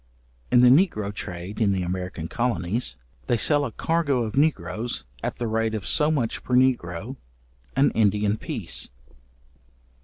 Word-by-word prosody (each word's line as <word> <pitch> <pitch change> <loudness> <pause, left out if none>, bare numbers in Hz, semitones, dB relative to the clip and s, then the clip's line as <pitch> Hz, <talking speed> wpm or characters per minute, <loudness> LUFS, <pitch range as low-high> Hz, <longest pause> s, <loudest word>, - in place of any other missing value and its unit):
In 125 - +6
the 125 - +7
negro 125 - +3
trade 90 +2 -6
in 100 -3 +3
the 95 -1 -1
American 90 -2 -4
colonies, 115 - -1 0.3
they 120 - +2
sell 145 +5 +2
a 120 - -4
cargo 145 -3 0
of 110 +1 -4
negroes 120 - 0 0.2
at - - -3
the 120 - -2
rate 110 0 0
of 105 - -5
so 150 -1 +2
much 130 -8 -1
per 125 - 0
negro, 125 -2 +1 0.6
an 135 +1 +4
Indian 105 -1 +2
piece. - - -4
115 Hz, 150 wpm, -25 LUFS, 100-130 Hz, 0.6 s, the